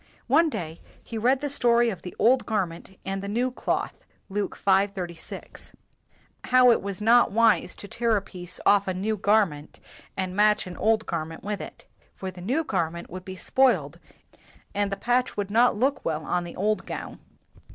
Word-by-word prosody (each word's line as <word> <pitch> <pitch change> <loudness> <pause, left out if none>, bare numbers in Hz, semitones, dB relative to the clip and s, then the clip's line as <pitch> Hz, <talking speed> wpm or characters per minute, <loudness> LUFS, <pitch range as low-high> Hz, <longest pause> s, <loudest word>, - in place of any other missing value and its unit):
One 315 +6 +4
day, 165 - -6 0.2
he 230 - -8
read 255 +4 +2
the 290 - -1
story 240 -3 +3
of 185 -5 -8
the 180 - -9
old 250 +3 +3
gar 210 -4 +1
ment 170 +3 -12
and 195 0 -3
the 200 - -5
new 240 +5 0
cloth - - -3 0.3
(Luke 205 +1 -3
v. 195 0 +3
36), 175 -4 -8 0.7
how 255 -1 +6
it - - +2
was 200 +1 -5
not 235 +2 +5
wise 230 +1 +3
to 200 - -10
tear 230 0 +1
a - - -1
piece 180 -2 -8
off 200 -1 +4
of 185 - -1
a - - -4
new 215 +3 0
garment 200 -8 +1 0.4
and 185 -1 -3
patch 210 0 +3
an 180 -1 -8
old 220 0 +1
garment 160 -1 -4
with 205 0 -3
it; - - -10 0.3
for 190 -1 -5
the 180 -1 -12
new 260 - 0
garment 170 - -3
would 185 +1 -7
be 190 0 -8
spoiled 260 +7 +1 0.7
and 205 0 0
the 195 - -2
patch 245 +3 0
would 200 -1 -2
not 240 +3 +4
look 270 +5 0
well 155 -1 -2
on 175 0 -1
the 170 - -9
old 210 +3 -1
gown. - - -6
205 Hz, 195 wpm, -26 LUFS, 185-235 Hz, 0.7 s, how